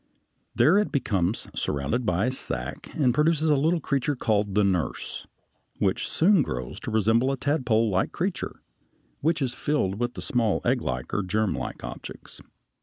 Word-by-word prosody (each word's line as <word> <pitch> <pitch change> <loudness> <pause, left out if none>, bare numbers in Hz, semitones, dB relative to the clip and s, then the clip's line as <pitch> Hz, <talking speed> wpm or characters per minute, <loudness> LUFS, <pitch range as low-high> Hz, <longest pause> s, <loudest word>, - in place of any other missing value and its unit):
There 185 +7 +5
it 210 - 0
becomes 100 - 0
surrounded 75 - -1
by 90 +4 +2
a 125 - +1
sack 130 - -5
and 130 -6 +3
produces 155 +2 +2
a - - +5
little 160 +5 +2
creature 140 0 0
called 105 -5 0
the 105 - +4
nurse 95 -4 -1 0.5
(b), - - +1
which - - 0
soon 185 +1 +4
grows 65 - -4
to - - -6
resemble 110 +3 +3
the 135 0 0
tadpolelike 115 - +1
creature 180 +1 -3
(C), - - -29 0.6
which 155 -1 +1
is 125 -2 -1
filled 120 -8 -1
with 120 0 -2
small 115 -5 +1
egglike 60 -1 -1
or 105 - +1
germlike 105 +2 -2
objects - - -8
(a). - - -15
120 Hz, 165 wpm, -26 LUFS, 100-145 Hz, 0.6 s, There